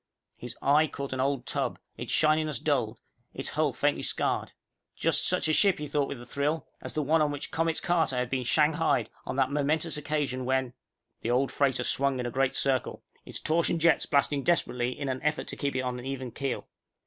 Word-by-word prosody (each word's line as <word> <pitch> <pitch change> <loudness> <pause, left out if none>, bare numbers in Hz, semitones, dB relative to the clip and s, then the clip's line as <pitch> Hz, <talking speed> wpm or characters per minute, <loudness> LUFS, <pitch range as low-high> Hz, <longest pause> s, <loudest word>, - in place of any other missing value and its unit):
His - - -8
eye 150 +3 +5
caught 140 -2 -5
an 130 - -3
old 135 0 0
tub, - - -2 0.2
its - - -6
shininess 155 -1 +2
dulled, - - 0 0.4
its - - -2
hull - - +1
faintly - - 0
scarred. - - -1 0.4
Just - - +2
such - - +2
a 155 - +2
ship, 195 +2 +4
he 150 - -5
thought 145 -1 0
with 140 - -6
a 120 - -10
thrill, 145 +5 -1 0.2
as - - -7
the 155 - 0
one 155 +3 +3
on 150 - +3
which 145 -1 -5
Comets 165 0 0
Carter 165 -6 +1
had 125 -1 -1
been 130 -1 0
shanghaied 155 +5 +2 0.2
on - - -3
that 135 0 +2
momentous 150 +3 0
occasion 145 -4 -2
when... 130 -1 0 0.5
_The 115 - 0
old 130 +2 +2
freighter 140 -3 +1
swung 140 -1 +1
a 120 -1 -2
great 135 +1 +1
circle, 135 -2 0 0.2
its - - -6
torsion 165 +1 +1
jets 165 0 +3
blasting 140 0 +2
desperately 125 -7 0
in 140 - -3
an 130 -1 -2
effort 150 +1 -1
to - - -5
keep 140 -2 -2
it 130 - +1
on 125 -1 -3
an 125 - -9
even 130 -2 -4
keel. 135 +2 -3
140 Hz, 205 wpm, -28 LUFS, 130-155 Hz, 0.5 s, eye